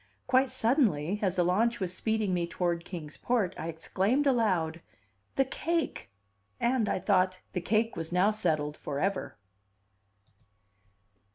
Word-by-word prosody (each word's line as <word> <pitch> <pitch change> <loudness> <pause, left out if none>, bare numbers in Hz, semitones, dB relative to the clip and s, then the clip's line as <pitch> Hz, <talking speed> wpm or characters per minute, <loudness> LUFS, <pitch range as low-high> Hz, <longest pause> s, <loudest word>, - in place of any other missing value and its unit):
Quite 260 +1 +3
suddenly, 210 - +1
as 190 -3 +1
the 180 - +3
launch 225 +7 +2
was 185 -2 -2
speeding 220 -3 0
me 175 -1 0
toward 170 -1 -1
Kings 160 -5 -8
Port, 220 -7 0
I 160 - -5
exclaimed 195 - 0
aloud: 185 - +1 0.5
"The 270 - +3
cake!" 330 - -2 0.5
And, 235 -3 +1
I - - +1
thought, 185 -1 +2
the 180 - -1
cake 225 +4 +1
was 165 0 -4
now 185 +4 +4
settled 155 -8 -1
forever. 185 +7 -2
190 Hz, 130 wpm, -29 LUFS, 170-230 Hz, 0.5 s, now